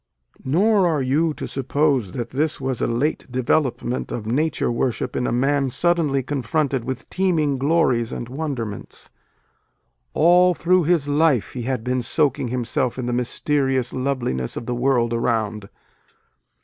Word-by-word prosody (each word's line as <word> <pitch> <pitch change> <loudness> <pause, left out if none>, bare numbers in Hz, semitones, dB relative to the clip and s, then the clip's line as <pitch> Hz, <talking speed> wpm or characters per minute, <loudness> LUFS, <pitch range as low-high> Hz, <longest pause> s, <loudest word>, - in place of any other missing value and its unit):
Nor 190 +7 +3
are 155 -5 +1
you 150 +5 +1
to - - -5
suppose 135 -6 0
that 120 -1 -4
this 150 +4 -1
was 130 -2 -3
a - - +1
late 130 +3 -1
development 130 0 0
of 110 - -4
nature 140 +4 0
worship 120 +1 -2
in 125 - 0
a - - -1
man 135 +3 +1
suddenly 155 -2 +1
confronted 140 0 -1
with 130 -2 -5
teeming 160 -8 +1
glories 130 -6 +2
and 120 - -5
wonderments. 125 -7 -5 1.0
All 180 +3 +5
through 180 0 +2
his 165 -3 +2
life 145 -5 +2
he 125 - -4
had 125 -4 -2
been 125 +1 0
soaking 140 +1 0
himself 120 0 -1
in 130 - -3
the 120 - -2
mysterious 130 +1 0
love 130 0 -1
liness 65 - -3
of 115 - -5
the 125 - -2
world 120 -1 +1
around. 110 -3 -1
130 Hz, 150 wpm, -22 LUFS, 120-150 Hz, 1.0 s, All